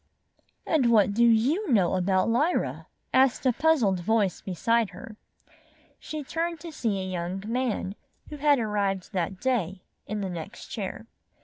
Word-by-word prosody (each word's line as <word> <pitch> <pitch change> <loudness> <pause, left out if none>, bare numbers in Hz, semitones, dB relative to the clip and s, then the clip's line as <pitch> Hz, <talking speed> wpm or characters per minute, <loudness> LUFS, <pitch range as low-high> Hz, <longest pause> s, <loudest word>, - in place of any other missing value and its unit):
"And 275 -7 +2
what 205 -3 +4
do 235 +3 +3
you 260 - +3
know 195 -7 +3
about 185 0 +2
Lyra?" 290 +10 0 0.3
asked 265 0 +3
a 255 - +4
puzzled 255 - +2
voice 205 +1 +1
beside 225 +4 +1
her. 190 +4 -11 0.8
She 310 -1 -6
turned 330 +3 -3
to 335 - -7
see 220 -9 -1
a 190 - -3
young 185 +1 -4
man, 230 -4 -1 0.4
who 300 - -7
had 290 0 +4
arrived 205 -4 -1
that 185 0 -2
day, 195 -8 -1 0.2
in 210 0 -3
the 195 - -3
next 175 +6 -8
chair. 210 0 -5
220 Hz, 150 wpm, -27 LUFS, 190-260 Hz, 0.8 s, what